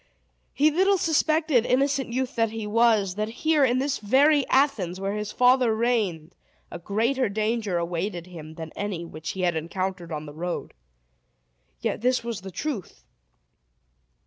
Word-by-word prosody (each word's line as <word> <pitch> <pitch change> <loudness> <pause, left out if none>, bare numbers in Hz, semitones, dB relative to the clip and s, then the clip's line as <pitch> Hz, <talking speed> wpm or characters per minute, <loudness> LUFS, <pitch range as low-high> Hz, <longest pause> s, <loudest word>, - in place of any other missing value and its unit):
He 300 +2 +3
little 385 +5 +3
suspected, 315 -6 +2
innocent 270 +1 +1
youth 255 +2 -2
that 225 -2 +2
he 220 -1 -5
was, 215 -3 +3
that 210 +2 -2
here, 305 +5 +1
in 250 -1 +3
this 275 +1 -1
very 275 +6 +3
Athens, 230 -11 +1
where 195 +1 -2
his 210 0 -4
father 250 -2 +4
reigned, 210 -9 -1 0.4
a - - -6
greater 230 +8 0
danger 215 -2 -1
awaited 175 +1 -3
him 160 -3 -10
than 160 -1 -7
any 195 -5 -4
which 155 -1 -6
he 190 - -5
had 175 -2 +1
encountered 175 +2 -4
on 155 -1 -4
the 145 - -9
road. 175 +3 -4 1.1
Yet - - -2
this 250 0 +1
was 230 -4 -4
the 190 - -8
truth. 225 - -5
215 Hz, 155 wpm, -25 LUFS, 180-260 Hz, 1.1 s, father